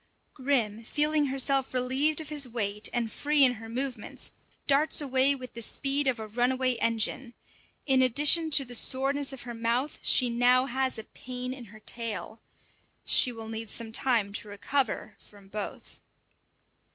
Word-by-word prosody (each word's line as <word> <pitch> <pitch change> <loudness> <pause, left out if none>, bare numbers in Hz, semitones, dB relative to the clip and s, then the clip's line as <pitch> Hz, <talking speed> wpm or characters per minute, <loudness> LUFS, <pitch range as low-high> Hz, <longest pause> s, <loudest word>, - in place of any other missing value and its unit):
Grim 240 -6 0
feeling 300 +3 +1
herself 270 0 0
relieved 265 +5 +1
of 310 -2 -5
his 295 -3 +2
weight, 210 -3 -2
and 235 -2 -2
free 295 +3 +3
in 255 -2 +5
her 225 - -9
movements, 250 -1 -4 0.3
darts 290 +3 +2
away 270 -1 +3
with 255 -2 -10
the 235 - -7
speed 275 +4 +1
of 255 -2 +1
a 220 - -6
run 245 +4 +1
away 260 0 +1
engine. 230 +2 0 0.5
In 265 -2 +3
addition 295 +6 +4
to 280 -2 +4
the 245 - -8
soreness 270 +4 +1
of 270 - -7
her 240 0 -7
mouth, 235 +5 -1
she 250 - +4
now 245 +2 +3
has 265 -1 -1
a 220 - -4
pain 250 +2 -7
in 255 -2 -10
her 215 +1 -15
tail. 225 -1 -2 0.6
She 250 - +5
will 225 -2 -9
need 225 0 -5
some 225 +1 -3
time 225 -4 +1
to 210 - -4
recover 210 +5 -2
from 200 -2 -19
both. 210 0 -7
255 Hz, 165 wpm, -28 LUFS, 230-275 Hz, 0.6 s, in